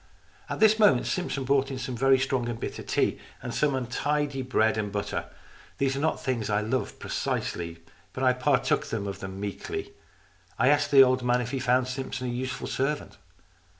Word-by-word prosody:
At - - -3
this 220 0 +5
moment 200 - +5
Simpson 175 -7 -2
brought 135 +1 +2
in 135 - -4
some 130 0 -4
very 135 +2 +4
strong 130 -2 0
and 115 -1 -4
bitter - - -5
tea, - - 0 0.2
and 125 - -6
some 140 +3 +1
untidy 140 +3 -1
bread 110 -4 +2
and 105 -2 -2
butter. 100 0 -3 0.5
These 135 -1 +1
are - - -2
not 160 +2 0
things 120 -5 -2
that 105 -1 +1
I - - +1
love 125 +5 -2
precisely, 85 -1 -3 0.3
but 130 - -4
I 130 -1 +5
partook 130 +2 +1
of 100 -3 -3
them 95 0 -7
meekly. 100 0 -5 0.6
I 130 - +4
asked 145 0 +3
the 135 -1 +9
old 130 0 +2
man 125 0 +2
if 120 0 -3
he 135 - -1
found 125 0 +2
Simpson 130 0 -4
a - - -2
useful 130 +1 -3
servant. 140 +3 -2
130 Hz, 190 wpm, -27 LUFS, 115-135 Hz, 0.6 s, the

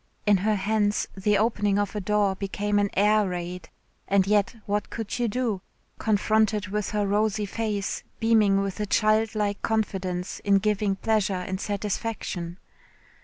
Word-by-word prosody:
In 205 -1 +5
her 210 +3 +1
hands 205 +1 +1
the 205 +2 +2
opening 205 -2 +1
of 205 0 -1
a 210 - -2
door 205 0 +2
became 205 +1 -1
an 205 0 +1
air 210 0 +3
raid 175 -1 -5 0.4
and 195 -1 +3
yet 205 +2 +2
what 205 +1 -1
could 225 +1 -4
you 240 - +2
do, 225 -4 -1 0.4
confronted 215 -1 +1
with 210 0 -2
her 210 -1 0
rosy 210 +1 +1
face 205 -1 -2 0.2
beaming 215 -4 +4
with 195 0 -3
a 210 - -1
child 215 +2 +2
like 205 -1 -1
confidence 190 -5 -2
in 200 -1 +3
giving 205 -1 +1
pleasure 205 -1 +1
and 185 +1 -4
satisfaction. 200 -4 -3
205 Hz, 155 wpm, -26 LUFS, 195-215 Hz, 0.4 s, In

